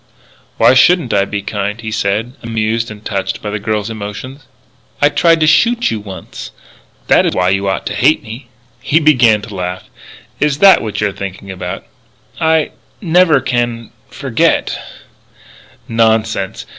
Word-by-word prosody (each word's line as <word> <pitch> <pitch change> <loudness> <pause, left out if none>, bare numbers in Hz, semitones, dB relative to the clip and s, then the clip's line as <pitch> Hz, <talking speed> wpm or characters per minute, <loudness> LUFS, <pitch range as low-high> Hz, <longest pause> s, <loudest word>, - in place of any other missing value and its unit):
"Why - - +5
shouldn't 130 +2 +4
I 100 -1 +2
be 100 -1 -4
kind?" 105 +1 -3
he 110 -1 -6
said, 110 +3 -1
amused 115 0 -2
and 110 0 -11
touched 100 -3 -3
by 105 - -5
the 105 - -3
girl's 105 +1 -2
emotion. 110 +6 -7 0.6
"I 145 - +4
tried 165 +2 +3
to - - +4
shoot 235 +9 +3
you 110 - -2
once. 95 -4 -9 0.6
That - - +4
is - - -2
why 90 0 +2
you 100 +1 0
ought 95 - -2
to - - -3
hate 150 +4 +2
me." 120 +2 -9 0.3
He 145 +4 +2
began 120 -9 +4
to 105 -1 -9
laugh: 90 -1 -5 0.5
"Is 145 -1 +1
that 195 +3 +6
what 110 -2 -4
you're 105 -1 +1
thinking 100 0 -7
about?" 90 0 -6 0.5
"I 160 -2 +2 0.3
never 175 -5 +3
can 120 -3 -2 0.2
forget - - 0 0.6
" - - -25
"Nonsense. 110 -3 0
110 Hz, 155 wpm, -15 LUFS, 100-135 Hz, 0.6 s, that